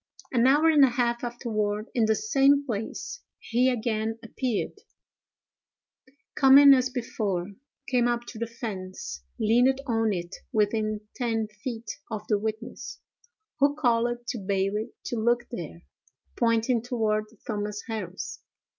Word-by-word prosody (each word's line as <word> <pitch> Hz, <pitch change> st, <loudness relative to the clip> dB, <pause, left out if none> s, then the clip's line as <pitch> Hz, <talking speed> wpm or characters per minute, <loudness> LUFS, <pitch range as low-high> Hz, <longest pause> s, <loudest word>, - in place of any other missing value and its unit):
An 245 Hz, 0 st, +4 dB
hour 295 Hz, +4 st, +5 dB
and 305 Hz, -3 st, +6 dB
a 270 Hz, -, +6 dB
half 240 Hz, -1 st, 0 dB
afterward, 215 Hz, -3 st, -2 dB
in 235 Hz, -3 st, +3 dB
the 220 Hz, 0 st, +3 dB
same 280 Hz, -, +3 dB
place, 225 Hz, -, -4 dB, 0.2 s
he 250 Hz, +3 st, +1 dB
again 225 Hz, -2 st, -1 dB
appeared, 240 Hz, -, -3 dB, 1.5 s
coming 275 Hz, +1 st, +8 dB
as 260 Hz, -1 st, +3 dB
before; 205 Hz, -7 st, -2 dB, 0.4 s
came 245 Hz, -2 st, +2 dB
up 240 Hz, 0 st, -1 dB
to 220 Hz, -, -9 dB
the 230 Hz, -, -2 dB
fence; 185 Hz, -, -6 dB, 0.2 s
leaned 245 Hz, +5 st, +4 dB
on 225 Hz, -4 st, +1 dB
it 175 Hz, -1 st, -4 dB
within 215 Hz, 0 st, +1 dB
ten 225 Hz, -3 st, -1 dB
feet 230 Hz, +3 st, -6 dB
of 215 Hz, -2 st, -5 dB
the 210 Hz, -2 st, +3 dB
witness, 220 Hz, +2 st, -5 dB, 0.6 s
who 285 Hz, +1 st, +4 dB
called 240 Hz, -3 st, +1 dB
to 245 Hz, -, -3 dB
Bailey 200 Hz, +3 st, -1 dB
to 240 Hz, -, -3 dB
look 240 Hz, +2 st, +1 dB
there 170 Hz, -5 st, -7 dB, 0.5 s
(pointing 230 Hz, 0 st, +2 dB
toward 220 Hz, -3 st, 0 dB, 0.2 s
Thomas 205 Hz, 0 st, -3 dB
Harris). 225 Hz, -2 st, -5 dB
230 Hz, 130 wpm, -27 LUFS, 215-250 Hz, 1.5 s, coming